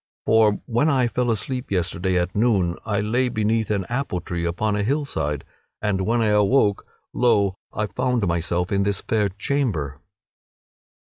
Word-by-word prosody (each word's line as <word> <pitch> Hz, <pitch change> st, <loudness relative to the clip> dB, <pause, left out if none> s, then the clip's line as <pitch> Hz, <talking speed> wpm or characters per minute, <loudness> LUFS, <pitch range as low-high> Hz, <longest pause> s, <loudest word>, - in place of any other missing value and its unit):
For 110 Hz, -2 st, +5 dB
when 120 Hz, +6 st, +1 dB
I 130 Hz, -4 st, +3 dB
fell 120 Hz, +1 st, -1 dB
asleep 125 Hz, +3 st, -2 dB
yesterday 90 Hz, 0 st, 0 dB
at 90 Hz, +1 st, -1 dB
noon 100 Hz, -6 st, +2 dB
I 100 Hz, -2 st, 0 dB
lay 120 Hz, +5 st, +1 dB
beneath 110 Hz, 0 st, 0 dB
an 100 Hz, -3 st, 0 dB
apple 120 Hz, -7 st, -2 dB
tree 85 Hz, -1 st, -4 dB
upon 100 Hz, +5 st, 0 dB
a 105 Hz, -, 0 dB
hillside; 105 Hz, -, -1 dB, 0.4 s
and 95 Hz, -3 st, -1 dB
when 115 Hz, 0 st, +2 dB
I 110 Hz, -, +2 dB
awoke 105 Hz, 0 st, +3 dB, 0.3 s
lo! 100 Hz, -6 st, +2 dB
I 110 Hz, -, -1 dB
found 125 Hz, +2 st, 0 dB
myself 85 Hz, +1 st, -1 dB
in 100 Hz, -1 st, +2 dB
this 100 Hz, 0 st, 0 dB
fair 105 Hz, -2 st, 0 dB
chamber." 100 Hz, -, -2 dB
105 Hz, 155 wpm, -23 LUFS, 95-120 Hz, 0.4 s, For